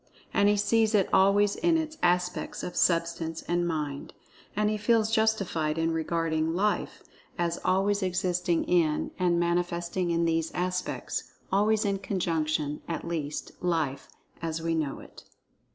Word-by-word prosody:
And 200 - +4
he 205 - +3
sees 220 +1 +2
it 195 -3 +3
always 200 +1 +4
in 335 -1 +2
its 315 -1 -3
aspects 180 0 0
of 175 - -5
Substance 165 -1 +1
and 175 0 0
Mind. 150 -4 -4 0.4
And 210 +1 +2
he - - 0
feels 220 0 +2
justified 195 -9 +1
in 165 0 +1
regarding 160 0 0
"Life" 210 +3 -1 0.3
as 170 -1 -1
always 200 +2 +2
existing 180 -2 0
in, 160 -4 +1
and 175 -2 +2
manifesting 175 +1 0
in 170 0 +1
these 165 -1 0
aspects—always 195 +3 -1
in 200 -1 0
conjunction—at 165 -4 -2
least, 155 -3 -3
Life 160 -6 -1 0.3
"as 165 -1 -2
we 165 0 -1
know 155 -4 -2
it." - - -14
175 Hz, 135 wpm, -28 LUFS, 165-200 Hz, 0.4 s, And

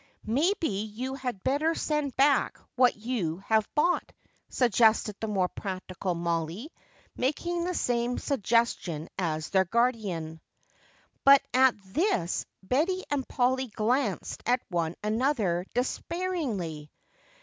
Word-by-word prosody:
"Maybe 320 - +1
you 215 +6 -4
had 250 -7 -5
better 305 +5 +1
send 300 -3 -1
back 280 0 +3 0.2
what 250 0 +4
you 210 -8 -2
have 220 -1 +2
bought," 345 +4 +2 0.4
suggested 225 -3 +3
the 220 - -3
more 195 -4 +1
practical 185 -1 -4
Mollie, 170 - -2 0.4
making 340 +6 -1
the 360 0 -2
same 240 -2 0
suggestion 230 - 0
as 155 -3 -2
their 190 -1 +4
guardian. 190 -8 -1 0.8
But 275 0 +8
at 260 -1 +5
this 200 - 0 0.2
Betty 325 - +1
and 280 -3 -1
Polly 260 +1 +1
glanced 220 -1 -1
at 245 +1 +2
one 170 -2 -1
another 215 -6 0
despairingly. 250 - -2
235 Hz, 115 wpm, -28 LUFS, 190-275 Hz, 0.8 s, But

